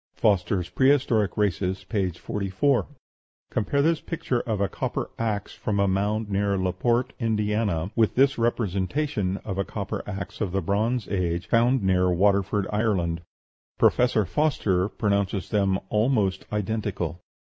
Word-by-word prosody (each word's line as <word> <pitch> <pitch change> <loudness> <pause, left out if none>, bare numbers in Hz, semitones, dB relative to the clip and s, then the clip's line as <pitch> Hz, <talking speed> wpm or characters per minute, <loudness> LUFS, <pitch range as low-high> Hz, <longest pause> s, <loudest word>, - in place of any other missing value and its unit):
(Foster's 90 -3 +1
"Prehistoric 130 -7 +2
Races," 95 -2 0
p. 100 -5 -1
44.) 100 - 0 0.6
Compare 140 +6 +1
this 165 0 +2
picture 135 -7 -2
of 110 -4 -2
a 100 - +2
copper - - -3
axe 105 -3 -2
from 100 -2 -2
a 100 - +3
mound 105 +3 0
near 100 0 0
Laporte, 95 +7 0
Indiana, 105 -5 0
with 110 -2 +2
this 135 0 +3
representation 105 - 0
of 95 -2 -3
a - - +2
copper 100 0 -4
axe 100 +1 -6
of 95 -4 -1
the 95 - +1
Bronze 110 +5 0
Age, 90 -2 -1
found 120 +1 +3
near 90 -1 +3
Waterford, 100 +2 +2
Ireland. 95 -6 0 0.6
Professor 120 -4 +3
Foster 105 -10 +1
pronounces 100 -2 -1
them 95 -2 +1
almost 105 -4 +1
identical. 100 -5 -2
100 Hz, 135 wpm, -25 LUFS, 95-115 Hz, 0.6 s, a